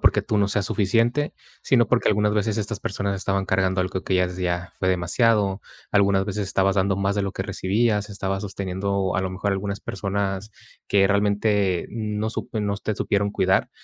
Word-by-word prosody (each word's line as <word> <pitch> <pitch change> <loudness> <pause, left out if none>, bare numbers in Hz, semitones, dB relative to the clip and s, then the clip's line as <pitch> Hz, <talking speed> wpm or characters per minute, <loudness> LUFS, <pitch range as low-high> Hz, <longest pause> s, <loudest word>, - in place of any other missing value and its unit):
porque - - +4
tú 105 - 0
no 100 -1 +2
seas 100 -1 0
suficiente, 115 +7 +1 0.3
sino 120 -4 +3
porque - - +2
algunas 105 0 +2
veces 110 +1 0
estas 105 0 -3
personas 100 0 -2
estaban 95 0 -1
cargando 95 0 +1
algo 90 0 -2
que 95 - 0
ya 90 - +3
es 90 0 -5
ya 90 0 -2
fue 95 - 0
demasiado. 95 +3 +2 0.3
Algunas 100 -1 +3
veces 100 -1 -3
estabas 95 0 +2
dando 95 0 +2
más 100 0 0
de 100 - 0
lo 100 - -1
que - - -3
recibías. 105 +1 0
Estabas 95 0 -3
sosteniendo 95 0 -2
a - - +1
lo 95 0 -2
mejor 95 +2 -1
algunas 100 +1 -3
personas 100 +1 -3 0.4
que 95 -1 +4
realmente 100 -2 +1
no 105 -1 -2
sup - - -5
no 100 -1 -1
te 105 +1 -3
supieron 100 0 0
cuidar, 95 -1 +1
100 Hz, 190 wpm, -24 LUFS, 95-105 Hz, 0.4 s, porque